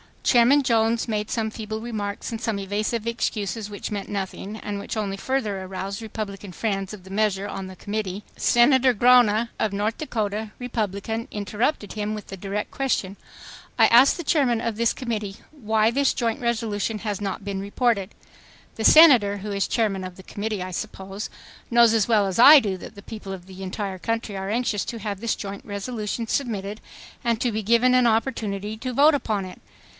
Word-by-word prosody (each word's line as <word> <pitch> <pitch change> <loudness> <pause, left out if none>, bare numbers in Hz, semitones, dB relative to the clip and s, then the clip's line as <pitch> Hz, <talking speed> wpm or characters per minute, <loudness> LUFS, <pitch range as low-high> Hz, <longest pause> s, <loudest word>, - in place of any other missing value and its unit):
Chairman 255 +4 +5
Jones 230 -2 +2
made 210 -1 -2
some 220 -2 -1
feeble 220 0 -5
remarks 210 -3 -4
and 225 - -4
some 225 -3 -2
evasive 210 +3 -2
excuses 215 -3 -2
which 205 0 -6
meant 205 -2 -4
nothing, 200 +1 -4
and 205 -2 -5
which 200 - -5
only 200 -3 -2
further 215 -5 -2
aroused 190 +2 -5
Republican 205 -3 -6
friends 195 -1 -2
of 200 -3 -10
the 190 - -13
measure 200 -1 0
on 195 -2 -5
the 185 - -10
Committee. 205 0 -4
Senator 255 +1 +4
Gronna 235 -1 +5
of 215 -2 0
North 210 +3 -1
Dakota, 215 -6 -3
Republican, 225 -2 -3
interrupted 210 +2 -2
him 215 0 -3
with 210 - -8
the 195 - -8
direct 200 +2 -4
question, 225 -8 -1 0.6
"I - - +7
ask 245 +4 +6
the 345 - -5
chairman 265 -7 +2
of 230 -2 -2
this 230 +1 +1
committee 215 -5 -4
why 220 -6 +1
this 275 +2 +2
joint 230 -2 -1
resolution 225 -2 -1
has 205 -2 -3
not 195 0 -3
been 200 -1 -3
reported? 200 0 0 0.6
The 220 - -2
Senator, 250 -11 +7
who 205 +2 -5
is 200 0 0
chairman 205 -5 0
of 185 -1 -7
the 190 - -13
committee, 205 0 -4
I 185 - -6
suppose, 195 +3 -6 0.4
knows 235 -1 +5
as 220 -3 +2
well 215 -4 +3
as 190 +2 -2
I 295 +5 +10
do 200 -6 -2
that 205 - -11
the 200 - -12
people 210 -3 -7
of 180 -2 -9
the 190 0 -11
entire 190 0 -4
country 225 +1 -3
are 190 0 -4
anxious 225 -2 0
to 230 - -5
have 205 -2 -4
this 230 +1 -1
joint 200 -1 -7
resolution 215 +2 -4
submitted 215 -4 -2 0.4
and 235 -2 +1
to 245 - +1
be 215 0 -2
given 235 +4 +3
an 250 -1 +5
opportunity 220 -3 -1
to 255 +2 -4
vote 295 +5 +6
upon 215 -8 -1
it. 185 - -11
215 Hz, 190 wpm, -24 LUFS, 200-235 Hz, 0.6 s, I